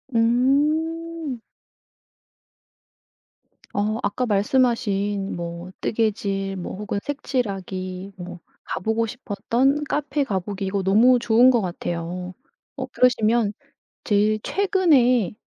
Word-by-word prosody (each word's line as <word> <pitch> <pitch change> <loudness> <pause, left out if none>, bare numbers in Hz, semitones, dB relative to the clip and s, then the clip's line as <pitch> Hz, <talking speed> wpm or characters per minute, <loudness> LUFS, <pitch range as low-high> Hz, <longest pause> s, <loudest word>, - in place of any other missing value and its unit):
음. 295 +5 +1 2.3
어 215 +3 0
아까 250 +5 -1
말씀하신 205 -3 +1
뭐 170 +1 -6
뜨개질 200 -3 -1
뭐 180 - -5
혹은 205 0 -3
색칠하기 195 -9 -4
뭐 180 -1 -8 0.3
가 - - -1
보고 225 +3 0
싶었던 245 +5 0
카페 290 0 -1
가 200 -7 -1
보기 195 +1 -4
이거 190 0 -1
너무 230 +7 +5
좋은 235 +2 +5
것 240 -2 +4
같아요. 175 0 -4 0.4
어 - - -4
그러시면 230 -3 +2 0.5
제일 210 0 +2
최근에 275 - +2
220 Hz, 195 characters per minute, -23 LUFS, 195-255 Hz, 2.3 s, 너무